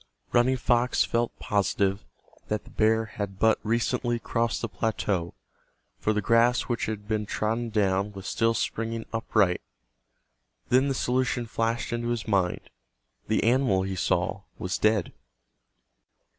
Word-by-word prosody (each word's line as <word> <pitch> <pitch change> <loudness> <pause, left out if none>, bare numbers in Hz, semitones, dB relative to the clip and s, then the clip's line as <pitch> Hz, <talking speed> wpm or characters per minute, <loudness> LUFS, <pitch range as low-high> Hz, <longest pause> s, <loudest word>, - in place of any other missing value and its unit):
Running 125 +2 +4
Fox 120 +1 +2
felt 120 0 -1
positive 100 0 0 0.4
that 105 0 -2
the - - -16
bear 110 +1 +2
had 100 -3 -5
but 110 +2 +3
recently 120 +2 0
crossed 115 0 -1
the - - 0
plateau, 100 -4 -2 0.6
for 110 - +1
the 105 -1 0
grass 115 +3 +4
which 120 -2 -2
had 105 -1 -5
been 105 -1 -1
trodden 115 +3 -1
down 100 -2 +1
was 95 -1 -9
still 115 0 +1
springing 115 +1 -2
upright. 105 -5 +2 1.1
Then 130 +3 +4
the 135 - 0
solution 125 -1 0
flashed 115 +1 -1
into 120 0 -2
his 120 -3 -2
mind—the - - -3
animal 115 -5 +3
he 95 0 -3
saw 90 +2 0 0.2
was 95 0 -3
dead. 105 -3 +2
110 Hz, 135 wpm, -27 LUFS, 100-120 Hz, 1.1 s, Running